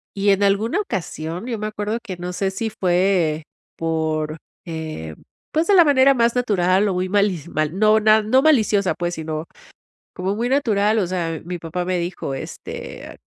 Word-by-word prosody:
y 200 0 +1
en 195 - +2
alguna 210 - +2
ocasión 175 - -5
yo 235 -3 -3
me 215 - -2
acuerdo 215 +2 -3
que, 190 -6 -7
no 180 +1 -5
sé 195 +1 -1
si 220 +4 -3
fue 175 -4 +1 0.3
por, 160 -1 -1 0.3
eh, 155 - -6 0.4
pues, 320 +2 +1
de 405 - +4
la 345 -3 +7
manera 275 -2 +5
más 235 -2 +2
natural 200 -4 +2
o 190 - 0
muy 180 +1 -1
malis 195 -5 +1
mal 155 +3 -1
no 215 0 +5
no 215 +4 +4
maliciosa, 215 - +3
pues 175 0 -3
sino 155 0 -4 0.7
como 190 +2 -2
muy 240 +2 -1
natural, 220 -6 +2
o 185 - 0
sea, 170 -3 -2
mi 175 +1 -5
papá 170 +2 -4
me 180 0 -1
dijo, 170 -5 -4
este, 135 - -8
190 Hz, 175 wpm, -21 LUFS, 170-220 Hz, 0.7 s, la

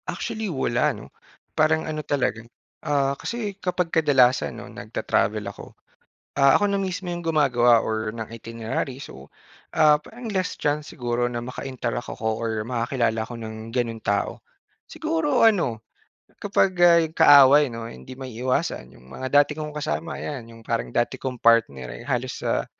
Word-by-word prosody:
Actually, 220 -2 -3
wala 130 -2 +1
ano 105 - -12 0.4
parang 160 +1 +2
ano 155 -1 -3
talaga, 135 -6 -1 0.4
ah, 140 -3 +1
kasi 225 -4 -4
kapag 180 -2 -1
kadalasan 130 - +3
'no - - -8
nagta-travel - - -1
ako, - - -9 0.6
ah, 140 -1 +6
ako 205 - +1
na 200 - +1
mismo 185 -1 -3
yung 175 - -5
gumagawa 125 -8 +3
or 110 0 -2
ng 110 0 -5
itinerary 115 +3 -4
so, 70 - -11 0.5
ah, 150 -1 +5
parang 230 +7 -8
less 185 -2 -1
chance 150 0 -1
siguro 120 0 -1
na 120 -1 -4
maka-interact 125 -2 -4
ako 110 0 -3
or 110 -2 -2
makakilala 115 -1 0
ako 115 +2 -6
ng 110 0 -7
ganun 115 -2 -2
tao. 100 -1 -1 0.5
Siguro 320 -5 +1
ano 145 - +2 0.6
kapag, 200 -1 +2
ah, 170 -1 +7
yung 160 -1 -3
kaaway 145 -2 +8
'no 115 0 -6
hindi 65 - -11
maiiwasan 125 - -2
yung 65 - -18
mga 130 0 -5
dati 145 - +1
kong 155 -1 -5
kasama 155 +2 -3
yan 125 -6 -6
yung 115 - -14
parang - - -2
dati - - 0
kong 130 -2 -4
partner 70 - +2
eh - - -10
halos - - -3
sa, - - 0
130 Hz, 160 wpm, -24 LUFS, 115-160 Hz, 0.6 s, kaaway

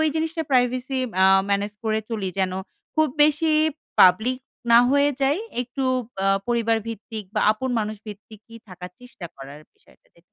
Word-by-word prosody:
জিনিসটা 320 +1 -2
প্রাইভেসি 255 +1 +1 0.3
আ - - +7 0.2
ম্যানেজ 200 +1 0
করে 220 -1 0
চলি, 210 -4 -3
যেন 190 -1 0 0.4
খুব 315 -1 +3 0.2
বেশি 305 +1 +2 0.5
পাবলিক 220 +7 +5 0.3
না 230 - +8
হয়ে 285 +1 +3
যাই। 275 +5 +2 0.2
একটু 250 +2 -5 0.4
আ - - +2 0.2
পরিবারভিত্তিক 225 -2 -2
বা 210 - +1
আপন 240 +5 -4
মানুষ 215 0 -3
ভিত্তিকই 215 +2 -12
থাকার 180 -1 -10
চেষ্টা 250 -8 -11
করার 140 +2 -11
বিষয়টা - - -27
যে - - -25
230 Hz, 145 wpm, -23 LUFS, 210-260 Hz, 0.5 s, না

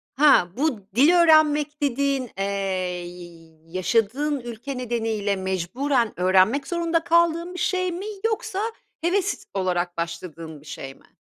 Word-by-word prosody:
Ha, 285 -10 +5
bu 280 -7 0
dil 280 +7 +6
öğrenmek 305 -3 +4
dediğin, 275 -2 0
eee, 195 - -1 0.6
y 175 -2 -12
yaşadığın 225 - 0
ülke 240 +3 -6
nedeniyle 225 -4 -1
mecburen 200 +7 -1
öğrenmek 190 +9 +3
zorunda 335 -1 0
kaldığın 340 +1 +2
bir 360 - -6
şey 370 -1 0
mi 355 +4 -5 0.2
yoksa 435 -3 -1 0.4
heves 380 +3 0
olarak 180 -2 -1
başladığın 165 -2 -6
bir - - -19
şey 135 -2 -7
mi? - - -26
250 Hz, 125 wpm, -24 LUFS, -, 0.6 s, dil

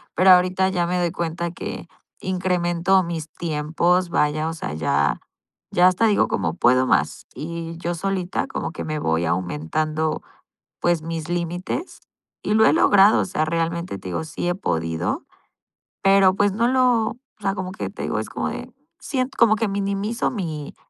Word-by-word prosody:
Pero 185 +1 +6
ahorita 185 +1 +4
ya 175 -2 0
me 180 0 0
doy 175 -2 0
cuenta 170 -1 -3
que 170 - -7 0.3
incremento 180 0 +1
mis 165 -2 -5
tiempos, 170 +3 0
vaya, 155 0 +1
o - - -4
sea, 75 - -5
ya 70 -2 +1 0.5
ya 180 +1 +5
hasta 185 +5 +3
digo 210 - +3
como: 85 -5 -1
"Puedo 130 +6 +3
más", - - +1
y 165 +1 -6
yo 175 0 -3
solita 190 +5 -2
como 265 - -4
que - - -6
me 155 -1 -3
voy 80 - 0
aumentando, 95 - -1 0.6
pues, 175 -2 +2
mis 165 -1 -4
límites, 175 - -3 0.4
y 210 - 0
lo 220 - +6
he - - +5
logrado. 205 +1 +5
O - - -1
sea, 155 -4 -1
realmente, 165 - -2
te 95 - -7
digo, 90 - -2
sí 165 +2 -4
he 175 - 0
podido, 80 - -2 0.8
pero, 195 -1 +5
pues 205 -1 +2
no 230 +4 +1
lo 255 0 +3 0.3
o 240 - -10 0.2
sea, 195 -1 0
como 185 -1 -4
que - - -5
te - - -8
digo, - - -1
es - - -5
como - - -2
de - - -7 0.3
siento 260 -1 -2
como 220 -2 +5
que 220 -1 0
minimizo 200 +3 -1
mi 160 - -5
175 Hz, 175 wpm, -22 LUFS, 155-190 Hz, 0.8 s, Pero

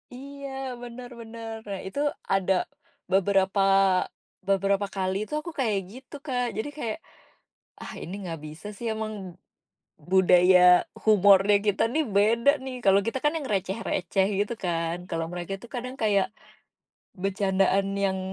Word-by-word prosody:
Iya 280 +1 -8 0.3
benar 245 0 -8
benar, 225 0 -7
nah 195 -2 -4
itu 195 - -5 0.3
ada, 195 0 +2 0.6
beberapa 195 +1 +2 0.9
beberapa 195 +1 +2
kali 190 -1 -1
itu - - -8
aku 340 - -7
kayak 220 -6 +1
gitu 255 +5 -12
Kak, 250 -4 -1
jadi 220 +7 -2
kayak, 230 -4 -3 0.9
ah, - - -7
ini 180 - -6
nggak 165 -4 -5
bisa 155 +4 -10
sih 235 - -6
emang, 220 0 -4 1.0
budaya 180 -1 +6 0.4
humornya 205 -1 +6
kita 205 - +2
nih 315 +2 +2
beda 230 +6 +4
nih 265 -1 -5
kalau 195 0 +6
kita 230 - -1
kan 295 +2 +2
yang 310 - -5
receh 195 +1 -1
receh 190 +1 +1
gitu 205 +3 0
kan, 170 -1 -1
kalau 165 0 -2
mereka 175 +1 -5
itu 235 - -13
kadang 250 +1 -5
kayak, 205 -3 +3 0.9
bercandaan 195 0 +1 0.2
yang, 190 -1 -1
200 Hz, 140 wpm, -26 LUFS, 190-235 Hz, 1.0 s, budaya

